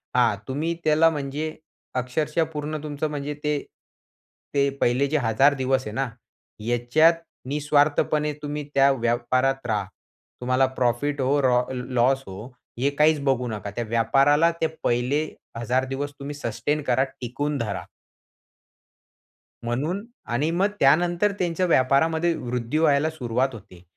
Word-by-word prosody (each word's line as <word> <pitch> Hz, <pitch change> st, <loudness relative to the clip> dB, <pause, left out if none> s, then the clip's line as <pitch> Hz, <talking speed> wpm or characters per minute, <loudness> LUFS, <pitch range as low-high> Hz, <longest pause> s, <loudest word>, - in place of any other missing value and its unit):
हा, 125 Hz, -4 st, +4 dB
तुम्ही 150 Hz, +5 st, -1 dB
त्याला 155 Hz, +1 st, +5 dB
म्हणजे 150 Hz, +1 st, -4 dB, 0.4 s
अक्षरशः 150 Hz, +6 st, 0 dB
पूर्ण 150 Hz, +1 st, -3 dB
तुमचं 150 Hz, 0 st, -3 dB
म्हणजे 145 Hz, 0 st, -4 dB
ते, 150 Hz, 0 st, +1 dB, 1.0 s
ते 140 Hz, -1 st, +3 dB
पहिले 125 Hz, +4 st, +2 dB
जे 155 Hz, +2 st, +1 dB
1,000 135 Hz, +3 st, +3 dB
दिवस 130 Hz, -1 st, 0 dB
आहे -, -, -4 dB
ना, 135 Hz, +2 st, 0 dB, 0.5 s
ह्याच्यात 120 Hz, +9 st, +3 dB, 0.4 s
निस्वार्थपणे 150 Hz, +1 st, +2 dB
तुम्ही 150 Hz, 0 st, -4 dB
त्या 140 Hz, 0 st, +5 dB
व्यापारात 130 Hz, +2 st, 0 dB
राहा. 105 Hz, -3 st, 0 dB, 0.6 s
तुम्हाला 130 Hz, +2 st, +3 dB
प्रॉफिट 130 Hz, +4 st, 0 dB
हो 135 Hz, +3 st, +2 dB
रो 125 Hz, -2 st, +3 dB
लॉस 125 Hz, +1 st, +1 dB
हो, 95 Hz, +4 st, -8 dB, 0.3 s
हे 135 Hz, +3 st, +2 dB
काहीचं 150 Hz, +1 st, +2 dB
बघू 130 Hz, -2 st, +1 dB
नका. 105 Hz, -3 st, -5 dB
त्या 120 Hz, +4 st, -3 dB
व्यापाराला 135 Hz, +8 st, +3 dB
ते 160 Hz, -, +3 dB, 0.2 s
पहिले 125 Hz, +6 st, +1 dB, 0.3 s
1,000 125 Hz, +3 st, 0 dB
दिवस 135 Hz, +2 st, -4 dB
तुम्ही 140 Hz, +1 st, -6 dB
सस्टेन 145 Hz, +3 st, -2 dB
करा, 130 Hz, 0 st, +2 dB, 0.2 s
टिकून 145 Hz, +4 st, -2 dB
धरा. 105 Hz, -6 st, -3 dB, 1.8 s
म्हणून 150 Hz, -, -2 dB, 0.3 s
आणि 145 Hz, +7 st, +1 dB
मग 185 Hz, +4 st, +2 dB
त्यानंतर 175 Hz, +8 st, +3 dB
त्यांच्या 175 Hz, 0 st, 0 dB
व्यापारामध्ये 160 Hz, +3 st, +3 dB
वृद्धी 125 Hz, +2 st, -3 dB
व्हायला 155 Hz, -1 st, +3 dB
सुरुवात 130 Hz, -4 st, -1 dB
होते. 95 Hz, -5 st, -13 dB
140 Hz, 135 wpm, -24 LUFS, 125-150 Hz, 1.8 s, त्याला